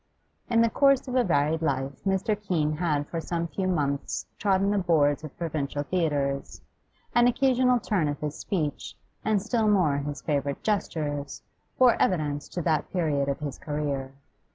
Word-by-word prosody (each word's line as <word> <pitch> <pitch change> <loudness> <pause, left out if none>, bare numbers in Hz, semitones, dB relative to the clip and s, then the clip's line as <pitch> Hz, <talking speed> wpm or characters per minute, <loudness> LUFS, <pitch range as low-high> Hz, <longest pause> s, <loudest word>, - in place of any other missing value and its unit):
In 230 -1 +4
the 230 - +4
course 275 +1 +3
of 250 - -4
a 255 -1 +3
varied 155 -3 +1
life 135 -3 -2
Mr. 195 +3 +1
Keene 165 -7 -1
had 150 -4 0
for 165 - -3
some 170 0 -2
few 185 +3 -2
months 145 -6 -1
trodden 195 -1 +2
the 205 - +2
boards 155 -5 +2
of 155 - -9
provincial 145 -3 -2
theatres; 145 -5 -1 0.5
an 240 0 +5
occasional 250 0 +3
turn 190 -9 0
of 145 0 -3
his 150 0 -3
speech, 155 -7 -3 0.3
and 215 -1 +2
still 220 +2 0
more 180 -9 +3
his 145 0 -5
favourite 140 -2 -1
gestures, 150 -9 -2 0.3
bore 255 -2 +5
evidence 150 -5 0
to 175 - -4
that 155 -2 0
period 150 -6 0
of 140 - -3
his 145 -3 -5
career. 145 -3 -3
160 Hz, 165 wpm, -27 LUFS, 145-200 Hz, 0.5 s, an